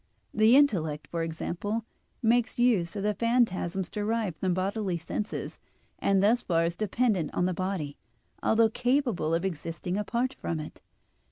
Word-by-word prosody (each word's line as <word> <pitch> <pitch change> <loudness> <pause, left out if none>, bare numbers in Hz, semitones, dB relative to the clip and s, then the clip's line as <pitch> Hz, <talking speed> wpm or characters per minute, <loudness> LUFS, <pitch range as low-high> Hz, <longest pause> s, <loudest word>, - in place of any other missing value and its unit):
The 220 +3 +5
intellect, 160 - +3
for 170 - -1
example, 175 +7 -3 0.4
makes 240 +1 +2
use 215 -8 +2
of 200 - -3
the 210 0 +1
phantasms 200 -5 +1
derived 210 -3 -2
from 190 - 0
the - - -1
bodily 190 -1 -1
senses, 170 +6 -4 0.4
and 195 -1 +2
thus 230 +4 +4
far 165 -2 +1
is 170 0 -1
dependent 215 -4 0
on 175 - +2
the 185 - 0
body, 180 -6 -3 0.4
although 225 0 +4
capable 245 - +1
of 170 +3 -1
existing 175 +1 -3
apart 240 +5 -1
from 165 - -4
it. 155 - -8
195 Hz, 155 wpm, -28 LUFS, 170-230 Hz, 0.4 s, The